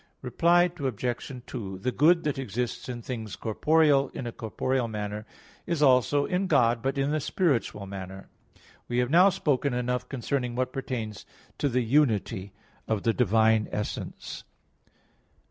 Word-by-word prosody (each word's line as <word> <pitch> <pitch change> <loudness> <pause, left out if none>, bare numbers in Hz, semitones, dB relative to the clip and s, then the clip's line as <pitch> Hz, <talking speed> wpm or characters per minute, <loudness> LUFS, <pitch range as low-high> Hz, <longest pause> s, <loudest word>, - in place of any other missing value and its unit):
Reply 170 +7 +4 0.2
Obj. 125 0 -3
2: 95 -6 -6
The 125 +7 -2
good 165 +6 +4
that 145 -3 -1
exists 125 0 -3
in 120 -2 -5
things 110 -4 -5
corporeal 145 +4 +3
in 130 - -5
a 120 - -3
corporeal 120 +3 -2
manner, 105 0 -5 0.4
is 170 -4 0
also 135 +2 +4
in 185 +2 0
God, 115 -7 +3
but 135 +2 -1
in 140 +2 +1
a 155 - +1
spiritual 135 - 0
manner. 95 0 -8 0.6
We 120 - -2
have 125 +1 +1
now 180 +4 +7
spoken 145 -8 0
enough 125 0 -2
concerning 125 -1 -2
what 130 0 -1
pertains 115 -6 -5 0.3
to 145 - +1
the 125 0 +1
unity 110 -6 +1 0.4
of 110 -3 -1
the 115 - +2
divine 110 -1 +3
essence. 105 - -5
125 Hz, 145 wpm, -27 LUFS, 110-140 Hz, 0.6 s, now